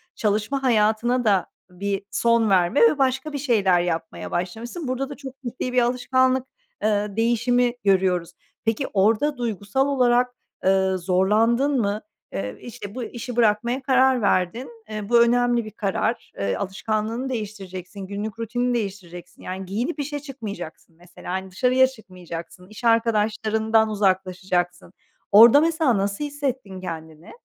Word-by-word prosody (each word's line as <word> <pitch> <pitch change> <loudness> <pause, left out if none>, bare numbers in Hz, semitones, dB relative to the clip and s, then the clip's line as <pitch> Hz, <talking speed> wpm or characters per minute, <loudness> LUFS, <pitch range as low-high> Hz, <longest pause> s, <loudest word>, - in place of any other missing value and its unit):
çalışma 215 +6 -1
hayatına 235 +1 +2
da 195 -4 +3 0.2
bir 195 +2 -3
son 230 -2 +2
verme 185 +6 +3
ve 460 -11 +5
başka 270 +3 0
bir - - -2
şeyler 205 -10 +2
yapmaya 165 -2 -4
başlamışsın. 225 - -4
Burada 260 +2 -2
da 285 - -7
çok 270 -2 -9
ciddi 250 +1 -4
bir 250 - +4
alışkanlık, 255 +1 +1 0.4
ııı, 210 -1 0
değişimi 240 +1 +2
görüyoruz. 185 -3 +2 0.3
Peki, 225 +5 0
orada 225 +9 +2
duygusal 235 +3 -1
olarak, 250 -2 +3 0.3
ııı, 190 0 +3
zorlandın 225 +9 +2
mı? 205 +1 -1 0.3
Iıı, 100 +1 -4
işte, 205 -3 -9
bu 255 - -4
işi 240 +1 -6
bırakmaya 235 +3 +2
karar 260 -2 +3
verdin. 210 +7 0 0.2
Iıı, 215 -1 -5
bu 235 -1 +6
önemli 240 0 +3
bir 215 - -8
karar. 215 +3 -2
Eee, 100 -1 0
alışkanlığını 215 +5 -2
değiştireceksin, 200 -5 -6
günlük 210 +3 -5
rutinini 245 +2 -1
değiştireceksin, 190 -6 -6
yani, 190 +1 -6
giyinip 235 - -3
işe 290 +1 -3
çıkmayacaksın, 205 - -8
mesela. 175 +1 -10
Hani, 190 0 -4
dışarıya 255 +6 +3
çıkmayacaksın, 180 -6 -10
iş 215 +3 -12
arkadaşlarından 220 -1 +2
uzaklaşacaksın. 185 -3 -1 0.4
Orada, 235 +8 +9
mesela, 320 - +2
nasıl 200 +7 -1
hissettin 265 -10 -4
kendini? 160 -2 -8
220 Hz, 135 wpm, -23 LUFS, 190-250 Hz, 0.4 s, Orada